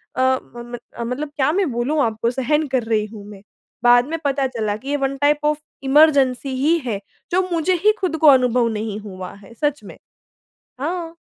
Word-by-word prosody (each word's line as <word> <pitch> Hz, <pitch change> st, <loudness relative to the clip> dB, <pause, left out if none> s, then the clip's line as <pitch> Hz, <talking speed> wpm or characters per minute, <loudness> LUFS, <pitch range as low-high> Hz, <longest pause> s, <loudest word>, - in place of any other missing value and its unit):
अ -, -, 0 dB
म 260 Hz, -2 st, -1 dB
म -, -, -3 dB, 0.2 s
अ, 235 Hz, -, -3 dB
मतलब 250 Hz, +6 st, -3 dB
क्या 275 Hz, +1 st, +2 dB
मैं 360 Hz, -4 st, 0 dB
बोलूँ 255 Hz, +6 st, 0 dB
आपको, 225 Hz, 0 st, 0 dB
सहन 290 Hz, +4 st, 0 dB
कर 260 Hz, -2 st, 0 dB
रही 220 Hz, -2 st, 0 dB
हूँ 210 Hz, -1 st, -11 dB
मैं। 205 Hz, -2 st, -11 dB, 0.4 s
बाद 245 Hz, +1 st, +5 dB
में 325 Hz, +2 st, -3 dB
पता 275 Hz, -1 st, +1 dB
चला 220 Hz, -5 st, -2 dB
कि 265 Hz, +6 st, -9 dB
ये 290 Hz, -, +1 dB
वन 275 Hz, 0 st, -2 dB
टाइप 290 Hz, +1 st, +2 dB
ऑफ 300 Hz, 0 st, +2 dB, 0.3 s
इमरजेंसी 270 Hz, -2 st, +3 dB
ही 300 Hz, +6 st, +2 dB
है, 210 Hz, -5 st, -2 dB, 0.3 s
जो 365 Hz, +2 st, +3 dB
मुझे 340 Hz, +2 st, +1 dB
ही 425 Hz, -, +6 dB
खुद 355 Hz, -4 st, -1 dB
को 315 Hz, -, +3 dB
अनुभव 250 Hz, -3 st, +5 dB
नहीं 215 Hz, 0 st, -4 dB
हुआ 185 Hz, -3 st, -8 dB
है, 200 Hz, +3 st, -15 dB
सच 295 Hz, +4 st, -1 dB
में। -, -, -11 dB, 0.8 s
हाँ। 330 Hz, +2 st, -3 dB
265 Hz, 200 wpm, -21 LUFS, 235-300 Hz, 0.8 s, ही